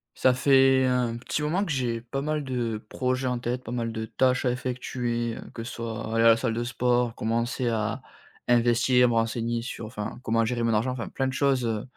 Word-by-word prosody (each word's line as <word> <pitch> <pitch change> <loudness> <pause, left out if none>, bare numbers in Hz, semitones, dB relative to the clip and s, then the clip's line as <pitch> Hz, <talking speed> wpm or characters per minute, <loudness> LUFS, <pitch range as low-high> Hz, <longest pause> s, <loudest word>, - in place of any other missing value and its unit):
Ça 130 - +4
fait 135 0 +4
un 125 -2 +1
petit 135 +5 -3
moment 170 +7 +1
que 180 - -3
j'ai 120 -4 -1
pas 130 +4 -4
mal 150 +1 -1
de 120 -5 -2
projets 130 0 -1
en 125 -1 0
tête, 125 +1 -3
pas 115 - -7
mal 115 -2 -2
de 110 0 -4
tâches 130 +4 +1
à 125 - +3
effectuer, 120 -2 -2
heu, - - -8
que 115 - -6
ce 120 - -6
soit 115 -1 -4
aller 115 - +3
à - - +7
la 115 - +6
salle 115 - -1
de 120 - -1
sport, 120 -1 +1
commencer 115 +3 -1
à 115 +3 -1 0.5
investir, 120 +1 +4
à - - +5
me - - 0
renseigner 115 +1 0
sur 115 -1 -6
enfin, 110 0 -6
comment 115 -1 +2
gérer 120 +1 -1
mon 115 -1 +2
argent. 110 +4 +1
Enfin, 125 -3 -4
plein 135 - -1
de 130 - -3
choses, 135 -2 +1
heu, 110 -2 -1
120 Hz, 230 wpm, -26 LUFS, 115-130 Hz, 0.5 s, à